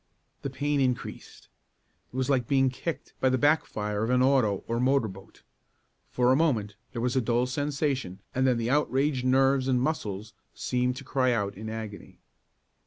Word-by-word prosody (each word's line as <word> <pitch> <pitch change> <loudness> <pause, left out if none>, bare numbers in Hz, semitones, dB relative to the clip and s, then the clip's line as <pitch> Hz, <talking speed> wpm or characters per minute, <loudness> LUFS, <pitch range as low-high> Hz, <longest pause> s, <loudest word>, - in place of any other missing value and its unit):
The 140 - -3
pain 145 +2 -1
increased. 125 -2 -3 0.6
It - - -14
was 130 -1 0
like 130 -4 +1
being 135 -1 +3
kicked 165 +5 -5
by 130 - +3
the 130 - +2
back 145 +5 +3
fire 105 0 -2
of 115 - -1
an 125 0 +3
auto 125 -8 +2
or 115 0 -1
motor 130 -1 +2
boat. 95 -1 -13 0.7
For 125 0 +2
a - - +5
moment 120 -10 +1 0.2
there 120 -2 -4
was 125 +1 0
a 130 - +3
dull 120 +1 +1
sensation 140 - -2
and 130 +1 +2
then 125 -2 +3
the 115 +1 -1
outraged 140 -2 +1
nerves 135 +1 +3
and 130 -2 +2
muscles 110 -7 -2 0.2
seemed 125 0 0
to 135 - -8
cry 130 -2 +1
out 100 -3 -1
in 110 +3 -6
agony. 110 -2 -7
130 Hz, 180 wpm, -28 LUFS, 115-135 Hz, 0.7 s, a